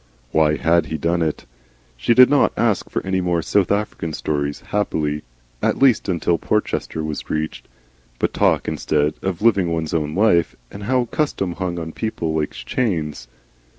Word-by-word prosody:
Why 75 -1 +3
HAD 85 +3 +2
he 80 - -3
done 85 +3 0
it? 80 -2 -2 0.5
She 65 - +1
did 125 0 +9
not 145 - +3
ask 110 -5 +1
for - - -3
any 95 0 0
more 85 -2 0
South 100 0 +1
African 100 -6 -2
stories, 70 -1 -2
happily 75 -7 -1 0.4
at - - +1
least 130 -6 +3
until 85 -1 +1
Porchester 105 -6 -1
was 75 -1 -5
reached 80 0 -3 0.5
but - - -1
talked - - +2
instead 75 0 0
of 95 0 -3
Living 100 -7 +3
One's 80 -2 -2
Own 75 -1 -1
Life, 90 -5 +3 0.2
and 100 0 -8
how 125 +1 +2
custom 115 - -1
hung 90 0 -3
on 80 -1 -5
people 85 -6 -3
like 75 -1 0
chains. 75 - -2
85 Hz, 165 wpm, -21 LUFS, 75-100 Hz, 0.5 s, did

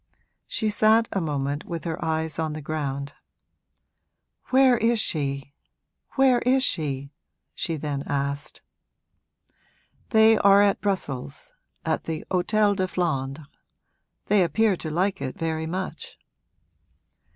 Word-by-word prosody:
She 215 -2 -1
sat 220 +2 +4
a 195 - -1
moment 145 -2 -2
with 170 -3 -5
her 165 -2 -4
eyes 160 0 -2
on 160 -1 -1
the 155 - -6
ground. 140 -2 -3 1.3
'Where 260 -1 +5
is 230 0 +2
she 140 -6 -2 0.6
where 265 -2 +4
is 260 +1 +2
she?' 140 - -2 0.4
she 165 - -2
then 145 -2 -3
asked. 140 +1 -3 1.5
'They 220 -1 +5
are 200 0 +6
at 200 -1 +2
Brussels, 195 - -3 0.3
at - - -1
the 160 -1 -4
Hôtel 205 +2 +2
de 185 -1 0
Flandres. 150 -5 -2 0.8
They 205 -2 +4
appear 195 +5 +2
to 160 - -5
like 185 +5 0
it 130 - -4
very 160 -1 -2
much.' 185 +3 -5
165 Hz, 120 wpm, -25 LUFS, 145-210 Hz, 1.5 s, are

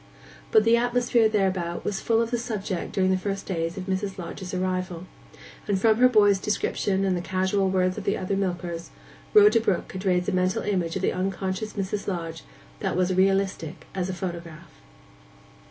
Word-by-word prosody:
But 220 - +6
the 230 +1 +5
atmosphere 240 -1 +2
thereabout 185 -5 -1
was 195 -2 -2
full 230 0 +2
of 230 - -5
the 240 - +1
subject 210 -6 -4
during 185 -1 +2
the 185 - +1
first 195 0 -3
days 165 -1 -2
of 190 - -4
Mrs. 190 0 -2
Lodge's 180 +1 -6
arrival; 185 -1 -2 0.6
and 200 -2 +1
from 220 +1 +4
her 255 0 +7
boy's 205 -4 +5
description 195 -1 0
and 190 -1 +1
the 175 - -2
casual 190 +2 0
words 185 -1 +1
of - - -7
the 200 - +1
other 190 +1 -2
milkers, 175 -3 -3 0.5
Rhoda 420 - +7
Brook 210 -5 0
could 185 0 -6
raise 180 -2 +1
a - - +1
mental 185 0 +1
image 180 -5 -1
of 190 - -3
the - - +2
unconscious 190 +2 -3
Mrs 200 0 -3
Lodge 165 -4 -4 0.4
that - - -1
was 185 0 +2
realistic 190 -3 0
as 185 -1 -2
a - - -2
photograph. 170 -3 -7
190 Hz, 185 wpm, -25 LUFS, 180-205 Hz, 0.6 s, her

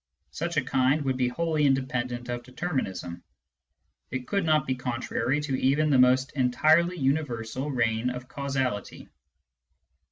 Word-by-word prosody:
Such - - -3
a - - +3
kind 135 +3 +2
would 135 -1 0
be 125 -1 +1
wholly 155 +2 +1
independent 125 -2 -1
of 120 0 -3
determinism: 120 - -4 0.9
it 130 -1 -4
could 200 -1 0
not 155 -3 +3
be 130 - 0
contrary 130 +2 -2
to 145 -3 -2
even 150 +3 +2
the 135 - +4
most 130 +1 +4
entirely 155 +7 +3
universal 135 -3 -1
reign 120 -2 0
of 125 0 -6
causality. 130 -7 -3
130 Hz, 135 wpm, -27 LUFS, 125-145 Hz, 0.9 s, the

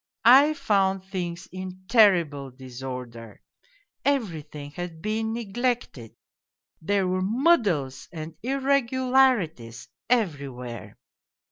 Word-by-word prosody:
I 280 +6 +7
found 195 -6 +1
things 175 -3 -5
in 185 0 -8
terrible 175 - +4
disorder 125 -3 -8 0.6
everything 155 - -2
had 175 0 -7
been 220 +4 -2
neglected, 230 - -3 0.7
there 195 +3 +1
were 185 0 0
muddles 200 - +1
and 160 -1 -7
irregularities 255 - +1 0.2
everywhere. 140 - -2
185 Hz, 85 wpm, -25 LUFS, 145-235 Hz, 0.7 s, I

